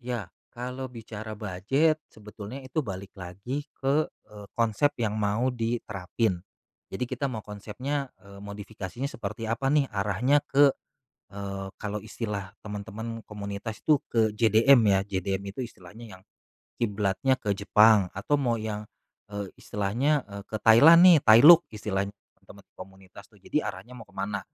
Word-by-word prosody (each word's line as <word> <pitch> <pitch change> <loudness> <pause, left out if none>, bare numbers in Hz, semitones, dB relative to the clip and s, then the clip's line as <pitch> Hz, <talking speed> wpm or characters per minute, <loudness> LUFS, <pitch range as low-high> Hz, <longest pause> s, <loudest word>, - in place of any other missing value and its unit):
Ya, 120 -6 -4 0.2
kalau 125 +2 -6
bicara 110 -2 -8
bujet 125 - 0
sebetulnya 105 +4 -9
itu 130 +4 -2
balik 95 -2 -7
lagi 100 +11 -6 0.2
ke, 140 +3 +1
eee, 105 -1 -15
konsep 115 +5 +2
yang 110 -2 -1
mau 110 +4 0
diterapin. 115 -4 -2 0.5
Jadi 125 - -3
kita 130 +2 -3
mau 110 -3 -5
konsepnya, 125 +7 -5
eee, 100 +1 -14
modifikasinya 100 +3 -6
seperti 115 -3 -6
apa 125 +4 -1
nih 145 -1 +3
arahnya 105 +9 +1
ke, 140 0 +4 0.6
eee, 100 -1 -6
kalau 105 0 -4
istilah 105 -3 -5
teman-teman 110 +2 -6
komunitas 105 +1 -6
tuh 150 -3 +4
ke 110 -2 +2
JDM 115 +4 +5
ya, 95 - +4
JDM 100 0 -3
itu 130 - -4
istilahnya 105 -1 -12
yang - - -25 0.6
kiblatnya 105 +4 +1
ke 105 - -2
Jepang 105 0 +5
atau 100 +9 0
mau 120 -3 +1
yang, 105 -1 -5 0.4
eee, 100 -2 -5
istilahnya, 125 +9 0
eee, 100 -1 -8
ke 110 - -3
Thailand 145 +10 +8
nih 180 -3 +9
Thailook 145 +10 +9
istilah 105 -2 -2 0.3
teman-teman - - -16
komunitas 95 +1 -13
tuh, 110 - -24
jadi 150 +10 -2
arahnya 100 +4 -10
mau 120 -3 -11
kemana, 100 +1 -4
110 Hz, 145 wpm, -27 LUFS, 100-125 Hz, 0.6 s, nih